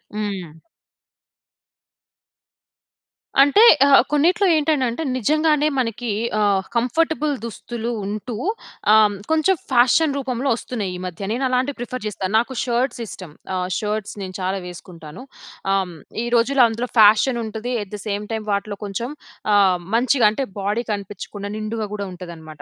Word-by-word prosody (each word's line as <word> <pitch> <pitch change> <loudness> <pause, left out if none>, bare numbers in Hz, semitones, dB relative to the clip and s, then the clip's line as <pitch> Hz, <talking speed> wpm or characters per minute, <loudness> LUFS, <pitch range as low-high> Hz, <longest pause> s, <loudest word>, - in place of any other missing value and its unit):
హ్మ్. 190 -7 -5 2.8
అంటే 285 +9 +5 0.3
ఆహ్, 275 - +7
కొన్నిట్లో 345 +8 +3
ఏంటంటే, 300 -3 +2
అంటే 235 +8 -4
నిజంగానే 300 +4 +2
మనకి 240 -1 -2 0.3
ఆహ్, 200 -2 +2
కంఫర్టబుల్ 305 +5 +1
దుస్తులు 235 +1 -5
ఉంటూ 215 +4 -4 0.6
ఆహ్, 215 -1 +5 0.2
కొంచెం 320 +4 +3 0.2
ఫ్యాషన్ 265 +4 +4
రూపంలో 265 0 -2
వస్తున్నాయి, 220 -5 -4
ఈ - - -9
మధ్య. 180 +1 -7
నేను 260 +3 -1
అలాంటివి 255 +2 0
ప్రిఫర్ 245 -1 -5
చేస్తా. 195 -2 -4
నాకు 240 +3 0
షర్ట్స్ 245 0 -1
ఇష్టం. 185 -5 -9 0.2
ఆహ్, 180 0 -2
షర్ట్స్ 210 -1 -3
నేను 185 -1 -7
చాలా 190 +1 -1
వేసుకుంటాను. 170 +1 -10 0.5
ఆహ్, 190 -3 -1 0.3
ఈ - - -3
రోజుల్లో 250 +2 +4
అందులో 235 +2 -4
ఫ్యాషన్ 220 +4 +5
ఉంటది. 220 +3 -4
అట్ 205 - -15
ది 205 - -8
సేమ్ 205 0 -2
టైమ్ 220 -1 -3
వాటిలో 200 0 -2
కొంచెం 205 +5 -4 0.5
ఆహ్, 190 -3 +4 0.2
మంచిగా 245 -1 +4
అంటే, 245 +6 -2 0.2
బాడీ 205 +4 -1
కనిపించకుండా 200 0 -6
నిండుగా 215 +1 -3
కూడా 200 -1 -4
ఉంటదనమాట. 165 -4 -10
225 Hz, 135 wpm, -21 LUFS, 200-255 Hz, 2.8 s, ఆహ్